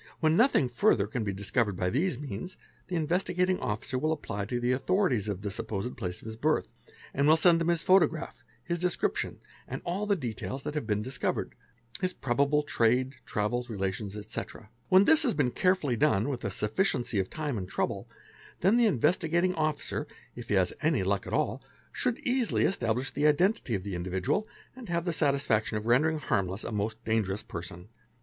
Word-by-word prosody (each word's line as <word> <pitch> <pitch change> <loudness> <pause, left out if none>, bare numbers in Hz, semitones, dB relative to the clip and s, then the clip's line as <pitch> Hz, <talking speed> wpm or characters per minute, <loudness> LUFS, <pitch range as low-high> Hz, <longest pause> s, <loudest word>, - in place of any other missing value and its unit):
When 160 0 +3
nothing 230 - +4
further 115 -4 +3
can 110 +2 -3
be 100 - -1
discovered 100 +1 -1
by 90 -1 0
these 145 -1 0
means, 145 - -6 0.3
the 180 - -3
Investigating 180 +3 +1
Officer 110 +4 -2
will 155 +4 +1
apply 115 -10 -3
to 120 +3 -2
the 120 +1 +1
authorities 135 - +1
of 100 -1 -3
the 100 - -2
supposed 105 +4 -3
place 90 -6 -5
of - - -14
his 110 0 -6
birth, 150 +7 +1 0.5
and 140 +1 +2
will 155 +1 +6
send 165 0 +5
them 165 - 0
his 170 -1 +1
photograph, 185 -4 +2 0.2
his 170 0 -2
description, 180 0 -1 0.3
and - - -4
all 190 +4 -2
the 205 - +3
details 130 - -5
that - - -4
have 150 -7 -3
been 105 -1 0
discovered 130 +4 -2 0.5
(his 185 -1 0
probable 140 +3 +1
trade, 130 0 +1
travels, 120 +4 -1
relations, 100 0 -3
etc.). 110 +1 -7 0.2
When 190 +2 +7
this 320 +5 +6
has 260 -8 +1
been 130 -5 +1
carefully 180 -8 +1
done 140 -4 +2
with 125 -3 -4
a 100 - -1
sufficiency 110 - 0
of 95 - -1
time 150 -4 -3
and 95 -4 -4
trouble, - - -2 0.5
then 195 +7 +4
the 240 -2 +5
Investigating 170 - +2
Officer, 155 -3 -2 0.3
if - - -8
he - - +2
has - - +2
any - - +2
luck - - 0
at - - -5
all, - - 0 0.3
should 250 -2 -1
easily 255 -4 +1
establish 125 - 0
the 145 +2 +2
identity 150 - +2
of 95 - -3
the 100 -1 -5
individual 95 - -1 0.3
and 255 -6 -10
have 170 0 -1
the 175 - 0
'satisfaction 140 -8 +1
of 105 - -5
rendering 150 +7 +3
harmless 95 -8 -1
a - - -5
most 110 +2 -3
dangerous 110 -2 0
person. 90 +2 -7
130 Hz, 190 wpm, -29 LUFS, 105-170 Hz, 0.5 s, When